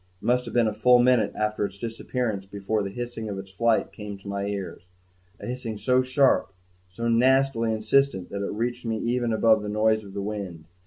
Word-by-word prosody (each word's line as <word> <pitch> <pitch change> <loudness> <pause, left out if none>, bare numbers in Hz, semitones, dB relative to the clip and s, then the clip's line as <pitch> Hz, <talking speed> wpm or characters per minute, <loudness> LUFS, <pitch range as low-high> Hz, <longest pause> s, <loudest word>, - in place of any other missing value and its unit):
It - - -13
must 125 +1 +2
have 115 - -7
been 120 -1 +4
a 110 - -1
full 125 +4 +5
minute 125 -1 +3
after 105 0 -1
its 100 -1 -4
disappearance 115 -2 -3
before 100 +2 -2
the 100 - -3
hissing 120 0 -5
of 100 - -4
its 95 0 -8
flight 115 +3 +1
came 105 -1 -7
to 100 - -14
my 100 0 -2
ears 100 -2 -5 0.6
a - - -8
hissing 120 -3 -4
so 125 +5 +2
sharp, 130 -4 +2 0.4
so 115 +6 -4
nastily 125 0 +3
insistent 110 -2 +1
that 100 0 -3
it - - -3
reached 120 +3 -3
me 115 -2 -2
even 120 +1 -1
above 110 0 +4
the 105 - -5
noise 110 +1 +2
of 100 -1 -12
the 100 - -2
wind. 100 -6 -5
110 Hz, 210 wpm, -25 LUFS, 100-120 Hz, 0.6 s, full